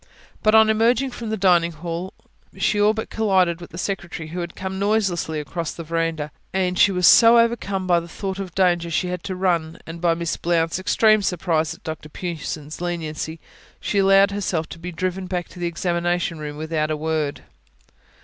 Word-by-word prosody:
But 215 0 +4
on 220 0 +7
emerging 230 +4 +2
from 235 -2 -6
the 220 - -1
dining 175 -3 +3
hall 170 +3 -5 0.4
she 205 - +1
all 210 +1 +5
but 220 0 -5
collided 185 -6 +2
with 170 - -9
the 170 - -10
secretary, 175 -4 -4
who 175 +3 -5
had 170 -1 -5
come 190 0 -5
noiselessly 195 -6 0
across 155 +2 -4
the 165 - -7
verandah; 165 -2 -2 0.2
and 180 -1 0
she 200 - +6
was 180 -1 +1
so 230 +4 +8
overcome 230 -5 +1
by 175 -2 +3
the 170 - -9
thought 190 +2 -5
of 195 - -3
the 175 - -31
danger 175 -2 +1
she 180 +2 0
had 180 +1 -5
run, 175 -4 0
and 165 +1 -8
by 170 -1 +3
Miss 170 -1 -2
Blount's 165 0 0
extreme 215 +3 +4
surprise 165 -4 0
at - - -21
Dr 160 -2 -6
Pughson's 155 -2 -6
leniency, 160 -2 -3
that - - -20 0.5
she 200 - +1
allowed 195 0 +5
herself 185 -5 -2
to 165 - -9
be 180 +2 -6
driven 185 +2 -3
back 180 -1 -3
to 180 - -13
the 175 - -1
examination 170 -1 -1
room 150 -1 -6
without 155 0 -1
a 155 - -1
word. 155 -2 -2
175 Hz, 195 wpm, -22 LUFS, 165-195 Hz, 0.5 s, so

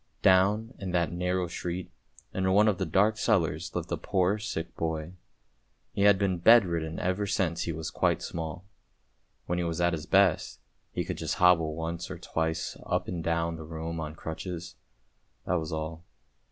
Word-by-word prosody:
" - - -42
Down 105 +5 +4
in 95 -3 -4
that 85 -2 +1
narrow 90 +1 0
street, 90 +2 -5 0.4
in 95 0 +1
one 105 +2 +5
of 105 -4 +2
the - - -1
dark 105 +3 +3
cellars 85 -6 +1
lived - - -3
a - - 0
poor 95 +2 +1
sick 105 -6 -4
boy; 80 +1 -3 0.8
he - - -2
had 100 -1 +7
been 95 -3 0
bed 115 +4 +7
ridden 80 -2 -3
ever 95 +3 0
since 85 -4 0
he 85 - -1
was 80 0 -4
quite - - +1
small. 80 +2 -5 0.8
When 90 0 -1
he - - 0
was 85 0 -2
at 85 0 +2
his 80 0 -4
best, 95 -3 +3 0.3
he - - -2
could - - -4
just - - -2
hobble 85 -4 +4
once 80 +1 -4
or - - -6
twice 80 0 -2
up - - -1
and 85 -2 -3
down 85 0 0
the 80 - -7
room 80 +1 -5
on 75 -1 -5
crutches; 85 +2 -6 0.7
that 90 -1 +1
was 80 +1 -5
all. 80 +1 -4
85 Hz, 185 wpm, -29 LUFS, 80-95 Hz, 0.8 s, had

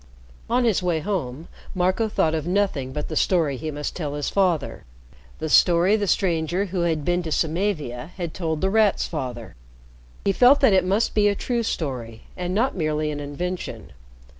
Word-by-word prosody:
On 245 +1 +2
his 225 -6 +2
way 175 -3 0
home, 160 -6 -3 0.3
Marco 185 +5 +1
thought 160 -6 +1
of 160 0 -2
nothing 180 -9 0
but 150 +2 -4
the 155 - -5
story 160 -5 +2
he 155 +5 -5
must 145 -1 -4
tell 150 -5 -4
his 145 -1 -2
father, 180 -7 0 0.5
the 155 - -4
story 175 +5 +5
the 205 -2 -1
stranger 175 0 +1
who 185 -1 -4
had 160 -4 0
been 175 0 +1
to 165 -2 -5
Samavia 155 -7 -1
had 170 -4 -4
told 160 -4 -2
The 190 0 +1
Rat's 215 -2 +3
father. 125 -7 -5 0.7
He 200 - +4
felt 250 +8 +6
that 265 -7 +5
it 185 - +4
must 205 +4 +1
be 210 -1 +3
a 205 - +2
true 240 +3 -1
story 125 - -4
and 180 0 -3
not 240 +5 +1
merely 155 -3 -1
an 145 - -4
invention. 175 +6 -5
175 Hz, 185 wpm, -23 LUFS, 150-195 Hz, 0.7 s, felt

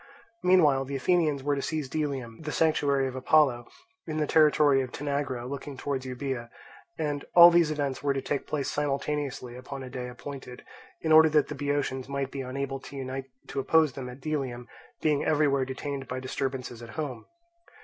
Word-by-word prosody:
Meanwhile 160 -8 +4
the 140 +1 -5
Athenians 150 -1 +1
were 145 0 +1
to 140 - -2
seize 155 0 -2
Delium, 135 -5 -3
the 155 -1 -4
sanctuary 140 -4 +2
of 130 - -6
Apollo, 130 -2 +3 0.4
in 155 -1 -3
the 155 - +1
territory 150 -3 +4
of 130 -2 -5
Tanagra 140 -4 -3
looking 140 +1 -6
towards 135 -1 -3
Euboea; 125 -2 -4 0.5
and 145 -3 -2
all 175 0 +11
these 170 -2 +4
events 145 -3 -2
were 145 - +1
to - - 0
take 145 - -2
place 145 -3 -2
simultaneously 140 -3 -2
upon 130 +2 -7
a 130 - -8
day 125 -1 -5
appointed, 125 0 -9 0.4
in 160 - -1
order 160 0 +8
that 150 -3 +3
the 150 - -4
Boeotians 140 -2 -2
might 140 -1 -2
be 135 - -4
unable 135 +1 -4
to 140 - -11
unite 135 0 -4 0.2
to 140 - -4
oppose 155 +1 +3
them 130 -1 -6
at 125 +2 -11
Delium, 130 -5 -3 0.4
being 150 -2 +2
everywhere 145 -3 +2
detained 135 +1 -5
by 130 - -4
disturbances 130 -2 -4
at 115 - -9
home. 140 -7 -4
140 Hz, 180 wpm, -28 LUFS, 130-150 Hz, 0.5 s, all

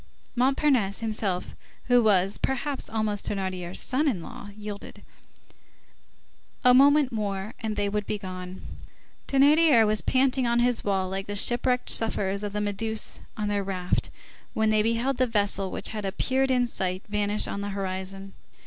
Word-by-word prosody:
Montparnasse 255 -5 +2
himself, 215 -5 -3 0.3
who 245 -1 +4
was, 195 -3 +2
perhaps, 270 +1 -2
almost 215 -2 -2
Thénardier's 185 -3 -3
son 280 +4 0
in 195 - -1
law, 205 - -9
yielded. 210 -1 -8 1.6
A 250 -1 +7
moment 280 +1 +5
more, 205 -1 -3
and 220 -2 -3
they 205 - 0
would 210 0 -2
be 210 - -1
gone. 185 -2 -8 0.6
Thénardier 280 -3 +5
was 215 -1 +1
panting 260 -1 +2
on 235 0 +2
his 240 0 +1
wall 190 -2 0
like 195 +1 -4
the 205 - -4
shipwrecked 245 +4 +2
sufferers 200 -3 0
of 205 - -3
the 210 - -1
Méduse 215 +2 -2 0.2
on 210 -1 -2
their 205 -1 0
raft 185 -2 -2 0.5
when 220 0 +2
they 215 0 +3
beheld 230 +4 0
the 255 - +2
vessel 205 -3 0
which - - -3
had 215 -1 -5
appeared 260 +7 0
in 250 -1 +3
sight 185 -5 -2
vanish 210 0 0
on 200 - -4
the 200 - -3
horizon. 195 0 -5
210 Hz, 155 wpm, -26 LUFS, 195-245 Hz, 1.6 s, A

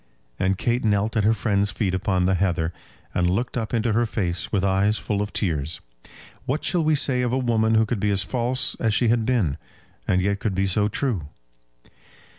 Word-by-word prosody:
And 95 +1 +1
Kate 120 +4 0
knelt 105 +1 +1
at 105 -2 +2
her 110 - +5
friend's 100 -1 0
feet 100 -2 -2
upon 95 -1 0
the 95 - +2
heather, 85 -3 0 0.4
and 90 0 +1
looked 120 +7 -1
up 115 -3 -2
into 115 -2 +1
her 120 +2 +2
face 90 -6 -3
with 100 -3 +1
eyes 100 +3 +2
full 105 -1 -2
of 105 - -3
tears. 80 -5 -2 0.7
What 140 +4 -1
shall 160 +2 +2
we 155 0 +3
say 135 -3 +2
of 125 -1 0
a 130 - +1
woman 115 -3 +2
who 110 0 +4
could 110 -1 -2
be 105 - +1
as 100 -1 +2
false 125 +4 -1
as 110 -3 +1
she 120 -1 +2
had 115 -1 +1
been, 105 - +1 0.5
and 90 - +2
yet 100 +2 0
could 100 -3 -2
be 95 +1 +1
so 105 +2 +1
true? 105 - -2
105 Hz, 210 wpm, -23 LUFS, 95-120 Hz, 0.7 s, her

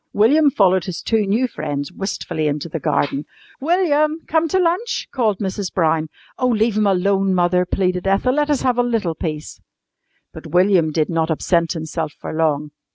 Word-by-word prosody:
William 285 +9 +4
followed 190 - +2
his 180 -3 -5
two 220 -3 0
new 230 +6 +1
friends 145 - -4
wistfully 165 -5 -3
into 150 +2 -2
the 165 0 -5
garden. 140 0 0 0.4
"William! 305 -1 +2
Come 320 0 +1
to 350 - 0
lunch!" 365 +6 0
called 220 -6 +1
Mrs. 190 -1 -3
Brown. 160 -2 +1 0.3
"Oh, 255 - +2
leave 225 -2 +1
him 210 -1 +2
alone, 195 0 +2
Mother," 180 0 +2
pleaded 180 -1 -1
Ethel. 195 +6 +2
"Let 295 +1 0
us 290 -3 +1
have 250 -2 +1
a - - +6
little 225 -8 -1
peace." 155 -1 -6 0.7
But - - -10
William 175 -1 +3
did 155 0 0
not 165 -1 0
absent 165 +1 +1
himself 160 -1 -4
for - - -6
long. 150 -2 0
190 Hz, 175 wpm, -20 LUFS, 160-245 Hz, 0.7 s, a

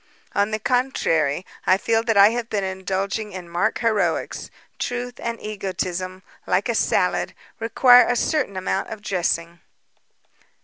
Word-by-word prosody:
"On 200 +1 +2
the 215 - -1
contrary, 190 - 0 0.2
I 185 - +5
fear 225 +3 +1
that 225 -2 0
I 200 +1 +8
have 235 0 -3
been 205 -2 -1
indulging 190 +3 -3
in 185 -2 -7
mock 170 +1 0
heroics. 225 -3 -1 0.3
Truth 245 0 -4
and 235 0 -4
egotism 185 -2 -4 0.2
like - - +1
a - - 0
salad - - +1 0.2
require 245 +2 +6
a 245 - +1
certain 255 -7 0
amount 190 +1 -2
of 215 -2 -8
dressing." 170 -3 -1
200 Hz, 140 wpm, -22 LUFS, 185-230 Hz, 0.3 s, I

